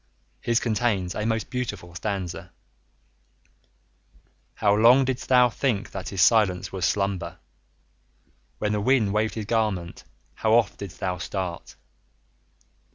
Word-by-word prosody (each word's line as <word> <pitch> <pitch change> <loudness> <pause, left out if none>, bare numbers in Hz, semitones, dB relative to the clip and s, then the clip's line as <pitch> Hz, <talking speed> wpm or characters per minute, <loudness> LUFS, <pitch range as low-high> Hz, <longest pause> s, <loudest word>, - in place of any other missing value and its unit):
His 120 - +1
contains 105 -6 0
a 105 - -2
most 110 -1 -2
beautiful 105 -9 -4
stanza: 95 -1 -4 2.0
"How 100 -1 +2
long 120 +5 +6
did'st 130 -1 -3
thou 125 -1 +6
think 120 -3 -1
that 95 -2 -6
his 95 -3 +2
silence 95 -5 +3
was 95 -2 -2
slumber! 95 -3 -2 1.2
When 105 - -1
the 105 -1 0
wind 110 -3 +2
waved 110 +1 0
his 110 -2 -4
garment 105 -6 -1 0.3
how 110 0 0
oft 110 -9 +2
did'st 100 -4 -8
thou 90 -2 -2
start!" 90 +1 -5
105 Hz, 125 wpm, -25 LUFS, 95-115 Hz, 2.0 s, long